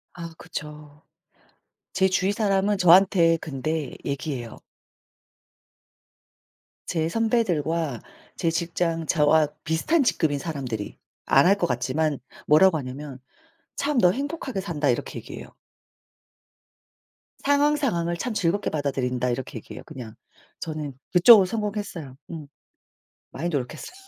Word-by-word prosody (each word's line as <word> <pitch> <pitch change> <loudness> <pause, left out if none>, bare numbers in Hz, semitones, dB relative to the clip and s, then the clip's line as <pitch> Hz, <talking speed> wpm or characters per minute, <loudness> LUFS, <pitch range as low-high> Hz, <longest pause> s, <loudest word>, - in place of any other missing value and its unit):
아 170 -1 -7
그쵸. 150 0 -9 0.9
제 190 0 +3
주위 190 +1 +1
사람은 205 -1 +1
저한테 180 -2 +5
근데 155 +1 -3
얘기해요. 135 -4 -4 2.3
제 160 -2 -1
선배들과 170 - 0 0.3
제 170 - 0
직장 165 0 -1
저와 155 0 +3 0.2
비슷한 265 - +1
직급인 155 - +1
사람들이. 130 -9 -5 0.3
안 135 - +5
할 195 +3 +5
것 - - 0
같지만 135 +4 -1 0.3
뭐라고 160 +3 +6
하냐면 135 0 -7 0.6
참 285 -1 0
"너 180 -6 +6
행복하게 275 - -3
산다." 160 -6 -2
이렇게 120 - -1
얘기해요. - - -10 1.9
"상황 285 +1 +3
상황을 175 - -1
참 245 +5 -3
즐겁게 200 0 0
받아들인다." 130 -4 -1
이렇게 125 0 -4
얘기해요 110 - -10
그냥. 125 -8 -9 0.4
저는 155 -3 -5 0.2
그쪽으로 195 +3 +8
성공했어요. 205 - -4 0.2
음. 155 -3 -7 0.8
많이 170 - -3
노력했어요. 140 - -4
165 Hz, 265 characters per minute, -25 LUFS, 145-195 Hz, 2.3 s, 그쪽으로